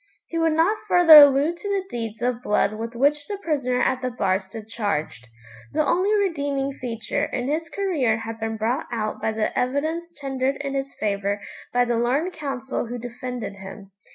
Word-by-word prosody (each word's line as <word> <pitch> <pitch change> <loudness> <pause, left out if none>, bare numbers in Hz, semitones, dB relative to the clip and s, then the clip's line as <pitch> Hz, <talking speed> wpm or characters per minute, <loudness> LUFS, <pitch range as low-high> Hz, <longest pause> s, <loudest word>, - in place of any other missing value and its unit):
He 330 - -3
would 325 -1 +2
not 350 +7 +2
further 350 -5 +9
allude 290 +3 +7
to 405 - -6
the 395 -1 0
deeds 225 - -5
of 245 -1 0
blood 210 -2 +1
with 230 +2 -6
which 290 +4 +2
the 410 - -4
prisoner 275 -9 -1
at 255 0 +1
the 255 - -1
bar 195 -6 0
stood 210 +3 -10
charged. 200 - -3 0.5
The 310 - +2
only 370 +4 +2
redeeming 285 -8 0
feature 235 -4 -3
in 245 -1 -3
his 320 +3 -2
career 315 - 0
had 225 0 -6
been 225 0 -3
brought 235 +7 -1
out 215 -2 -3
by 220 - 0
the 220 0 -2
evidence 315 +7 -1
tendered 270 -1 -1
in 275 -1 -4
his 275 0 -3
favour 200 -1 -1 0.3
by 245 0 +3
the 240 -1 0
learned 280 +10 0
counsel 270 -5 -4
who 245 +2 -5
defended 245 -3 -6
him. 195 +1 -10
255 Hz, 185 wpm, -23 LUFS, 225-300 Hz, 0.5 s, further